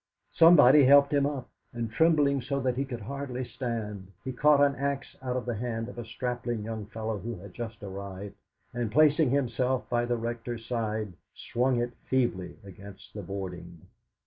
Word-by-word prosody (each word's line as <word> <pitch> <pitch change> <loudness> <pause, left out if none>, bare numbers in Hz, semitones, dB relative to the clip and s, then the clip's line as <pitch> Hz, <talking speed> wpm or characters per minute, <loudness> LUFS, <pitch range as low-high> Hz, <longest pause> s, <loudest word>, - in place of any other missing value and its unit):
Somebody 150 -4 +8
helped 140 +2 +6
him 140 -1 +3
up, 140 -4 -4 0.2
and 115 -2 -4
trembling 145 -1 +3
so 140 +3 -2
that 125 -1 0
he 135 +2 -1
could 120 -4 -6
hardly 130 +2 -4
stand, 105 -7 -5
he 130 - -3
caught 150 +3 +4
an 140 -1 +4
axe 140 0 -3
out 125 -1 -2
of 125 - -4
the 120 - -2
hand 115 0 -3
of 120 - -9
a 120 - -5
strapping 120 -1 -3
young 110 -1 -5
fellow 110 -1 -4
who 115 +4 -5
had 95 0 -11
just 115 -3 -7
arrived, 100 0 -7 0.4
and 120 -3 -2
placing 150 +2 +4
himself 130 -1 0
by 120 0 +2
the 120 0 0
Rector's 115 0 -5
side, 110 -4 -2 0.2
swung 125 +1 0
it 120 0 -2
feebly 120 -9 0
against 95 -1 -12
the 105 - -6
boarding. 90 -3 -7
120 Hz, 175 wpm, -28 LUFS, 105-135 Hz, 0.4 s, Somebody